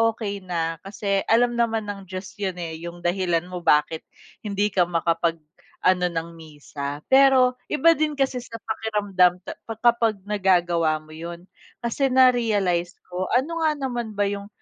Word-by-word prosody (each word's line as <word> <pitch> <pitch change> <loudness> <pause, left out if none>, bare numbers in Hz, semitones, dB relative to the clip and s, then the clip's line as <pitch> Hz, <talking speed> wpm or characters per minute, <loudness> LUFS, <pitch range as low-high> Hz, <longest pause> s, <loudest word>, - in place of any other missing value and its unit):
okey 205 -3 -4
na, 165 -3 -3
kasi, 200 -1 -2
alam 240 +1 +3
naman 225 -2 +1
ng 195 -2 -10
Diyos 185 +1 -7
’yon 190 -3 -2
eh. 160 -1 -5
Yung 175 0 -10
dahilan 175 -1 +1
mo 180 - -4
kung 170 - -17
bakit, 160 +1 -7 0.4
hindi 205 0 0
ka 180 -3 +2
makapag-ano 170 +2 -1
ng 165 -1 -4
misa, 145 -2 -7
pero 260 -2 +5
iba 330 +3 +4
din 305 -1 0
kasi 270 -2 0
sa 230 -1 -10
pakiramdam 200 -5 +1
ta - - -8
pa 225 - -4
kapag 230 -5 +2
nagagawa 175 -6 +1
mo 155 - -17
’yon, 170 +2 -8 0.4
kasi 270 +4 +1
na-realize 220 -9 +2 0.2
ko, 185 +1 -2
ano 330 +6 0
nga 310 - +4
naman 240 -6 -4
ba 205 - +1
yung 200 0 -5
195 Hz, 160 wpm, -24 LUFS, 170-235 Hz, 0.4 s, pero